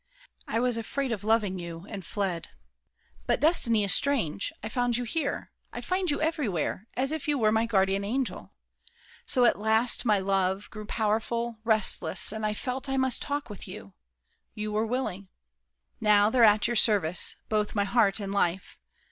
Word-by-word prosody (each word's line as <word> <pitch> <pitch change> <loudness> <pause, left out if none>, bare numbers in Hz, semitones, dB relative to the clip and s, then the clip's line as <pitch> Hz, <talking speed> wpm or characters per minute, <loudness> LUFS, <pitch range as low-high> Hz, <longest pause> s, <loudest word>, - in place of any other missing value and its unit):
I 225 - -1
was 245 -1 +1
afraid 260 +3 -3
of 210 -3 -3
loving 210 -4 +1
you, 170 0 -8
and 200 -3 -7
fled! 185 -2 -3 0.8
But - - +1
destiny 240 -9 +3
is 200 - +6
strange: 235 - +1
I - - -3
found 245 +1 0
you 245 - -2
here, 280 +5 -3 0.2
I - - -6
find 370 -1 -1
you 290 - 0
everywhere, 225 - -2
as 270 +3 0
if 315 -2 -4
you 295 -1 +1
were 215 -4 +2
My 220 +1 +1
guardian 195 -2 +1
angel. 250 +5 -3 0.8
So 250 -1 +3
at 235 - +3
last, 220 +3 +2
my 215 -4 +3
love 195 0 -1
Grew 215 -1 -8
powerful, 225 +2 -1
resistless, 220 -3 +2
and 220 0 -2
I 210 - -2
felt 260 +4 -4
I 270 - -1
must 260 -2 0
talk 285 -2 -3
with 205 -4 -9
you. 100 - -10 0.6
You 215 0 -4
were 215 +1 0
willing. 215 -6 -3 0.7
Now 210 0 +4
They're 245 -1 +4
at 210 -1 +4
your 240 - 0
service, 200 -6 +3
both 210 -1 -1
my 205 - +2
heart 205 0 +2
and 200 -1 -5
life. 185 -2 -1
220 Hz, 175 wpm, -27 LUFS, 200-245 Hz, 0.8 s, is